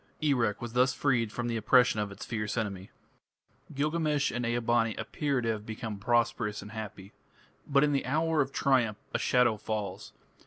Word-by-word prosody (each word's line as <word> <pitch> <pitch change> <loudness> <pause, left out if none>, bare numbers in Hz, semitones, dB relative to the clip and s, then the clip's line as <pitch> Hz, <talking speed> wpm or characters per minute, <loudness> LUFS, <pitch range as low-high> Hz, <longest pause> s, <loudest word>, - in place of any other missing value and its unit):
Erech 120 -9 +1
was 120 -1 -6
thus 130 +1 +3
freed 120 -6 +1
from 120 +2 -3
the 115 -1 -1
oppression 125 -1 +4
of 105 -1 -2
its 100 - -8
fierce 105 -1 -3
enemy. 100 -4 -3 0.9
Gilgamesh 150 0 +1
and 120 - -3
Ea 120 +1 0
bani 115 -1 +1
appear 140 -4 -1
to 115 - -1
have 110 -2 -2
become 110 -1 -6
prosperous 115 -1 0
and 105 - -10
happy. 105 -3 -8 0.5
But 140 0 +4
in 150 - +3
the 140 -2 0
hour 160 +2 +2
of 135 -1 -1
triumph 120 -8 +2 0.2
a - - +1
shadow 125 -3 +3
falls. 105 -1 -4
120 Hz, 180 wpm, -29 LUFS, 110-135 Hz, 0.9 s, oppression